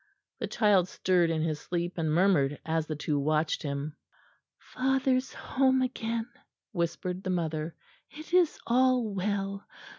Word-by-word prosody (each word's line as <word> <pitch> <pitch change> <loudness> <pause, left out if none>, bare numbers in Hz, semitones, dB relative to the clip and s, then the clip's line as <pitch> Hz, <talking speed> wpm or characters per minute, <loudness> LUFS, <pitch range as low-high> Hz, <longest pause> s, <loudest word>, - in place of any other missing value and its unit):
The - - -2
child 200 -5 +3
stirred 180 -2 +2
in 160 -1 0
his 155 -2 -1
sleep 175 +1 -3
and 160 -2 0
murmured 155 -5 +3
as 160 -1 0
the 155 - -3
two 150 0 -1
watched 155 +2 +1
him. 145 +1 -4 0.6
"Father's 265 0 0
home 260 -1 +1
again," 230 -2 -2 0.4
whispered 180 0 -2
the 190 - -4
mother. 160 -2 -2 0.3
"It 310 +3 -11
is 360 -3 +4
all 250 -3 +3
well. 195 0 -2
185 Hz, 140 wpm, -29 LUFS, 160-235 Hz, 0.6 s, is